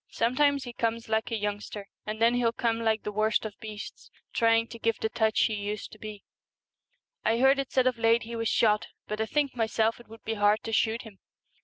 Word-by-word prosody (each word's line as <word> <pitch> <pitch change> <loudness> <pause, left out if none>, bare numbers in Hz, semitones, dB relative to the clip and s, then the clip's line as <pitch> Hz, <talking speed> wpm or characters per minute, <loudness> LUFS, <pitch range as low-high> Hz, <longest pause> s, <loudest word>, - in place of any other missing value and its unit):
Some 235 +2 0
times 285 -1 +3
he 245 - -7
comes 230 -1 -2
like 220 0 0
a 230 - -1
youngster, 205 -1 -4 0.2
and 215 +1 -4
then 230 +1 +4
he'll 245 -2 +2
come 230 -1 0
like 220 -1 +1
the 210 - -3
worst 215 +1 +1
of 215 - -4
beasts, 215 -2 -8 0.2
trying 230 0 +3
to 230 0 -9
give 230 0 0
the 220 - -1
touch 220 -1 +1
he 220 - +2
used 205 0 -4
to 215 - -14
be. 210 -2 -8 1.0
I 225 +1 +2
heard 265 +3 +5
it 275 - -3
said 260 -1 +3
of 255 -2 +1
late 230 +1 +4
he 230 +1 -6
was 225 -1 -1
shot, 210 -2 +3 0.2
but 215 +1 -3
I 220 - 0
think 290 -1 0
myself 225 -1 +1
it 240 - -15
would 225 0 -14
be 225 - -2
hard 205 0 +2
to 225 - -5
shoot 225 +1 +1
him.' 215 -4 -13
225 Hz, 230 wpm, -28 LUFS, 215-235 Hz, 1.0 s, heard